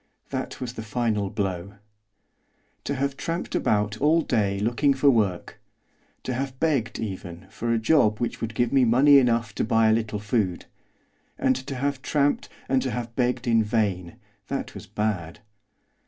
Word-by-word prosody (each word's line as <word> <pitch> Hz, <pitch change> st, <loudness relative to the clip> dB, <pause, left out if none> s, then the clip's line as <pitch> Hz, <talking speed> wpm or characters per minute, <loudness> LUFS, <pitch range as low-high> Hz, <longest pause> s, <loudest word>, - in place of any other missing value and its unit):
That -, -, -4 dB
was 125 Hz, -2 st, -5 dB
the 110 Hz, -, -6 dB
final 110 Hz, -3 st, -1 dB
blow. 95 Hz, -1 st, -3 dB, 1.1 s
To 140 Hz, -, -1 dB
have 140 Hz, +1 st, -1 dB
tramped 165 Hz, +4 st, -4 dB
about 105 Hz, 0 st, 0 dB
all 160 Hz, +3 st, +4 dB
day 100 Hz, -7 st, 0 dB
looking 120 Hz, +6 st, +2 dB
for 140 Hz, +1 st, +5 dB
work; 100 Hz, -7 st, -1 dB, 0.6 s
to 130 Hz, -, -3 dB
have 130 Hz, +1 st, -4 dB
begged 140 Hz, -8 st, 0 dB
even 90 Hz, -5 st, -6 dB
for 120 Hz, 0 st, -3 dB
a 115 Hz, -, +3 dB
job 110 Hz, -3 st, +3 dB
which 120 Hz, 0 st, -3 dB
would 115 Hz, -1 st, -4 dB
give 120 Hz, +3 st, +1 dB
me 135 Hz, -2 st, +5 dB
money 135 Hz, +4 st, +6 dB
enough 115 Hz, -4 st, +1 dB
to -, -, -1 dB
buy 115 Hz, 0 st, +3 dB
a -, -, +5 dB
little 110 Hz, -1 st, -1 dB
food; 105 Hz, -4 st, -1 dB, 0.7 s
and 130 Hz, 0 st, +2 dB
to 130 Hz, +2 st, -5 dB
have 140 Hz, +1 st, -2 dB
tramped 145 Hz, +1 st, 0 dB, 0.2 s
and 130 Hz, -1 st, +2 dB
to 130 Hz, -, -2 dB
have 120 Hz, 0 st, -5 dB
begged 125 Hz, 0 st, 0 dB
in 115 Hz, -1 st, +4 dB
vain, 100 Hz, -6 st, -1 dB, 0.3 s
that -, -, -4 dB
was -, -, -10 dB
bad. 100 Hz, -5 st, -3 dB
115 Hz, 170 wpm, -25 LUFS, 105-130 Hz, 1.1 s, money